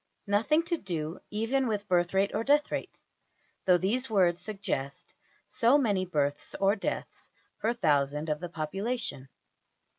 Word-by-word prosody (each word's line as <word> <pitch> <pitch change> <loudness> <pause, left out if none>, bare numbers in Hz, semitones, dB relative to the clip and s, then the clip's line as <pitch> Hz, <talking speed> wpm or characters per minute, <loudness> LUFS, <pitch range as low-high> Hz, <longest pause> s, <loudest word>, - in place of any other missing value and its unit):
Nothing 225 +11 +2
to 340 0 -1
do 165 - -4
even 235 +5 0
with 210 -2 -2
birth 175 0 +2
rate 195 +1 +3
or - - 0
death 290 +3 +3
rate, - - -4 0.7
though 180 -1 +6
these 230 +8 -1
words 180 -5 +3
suggest 195 -10 -4 0.3
so 240 +5 +4
many 205 -9 +1
births 145 -5 -1
or 195 +1 +4
deaths 200 - -5 0.3
per 225 - +1
thousand 150 -5 +1
of 150 -1 -1
the 175 - -5
population. 165 - -3
195 Hz, 145 wpm, -29 LUFS, 160-225 Hz, 0.7 s, though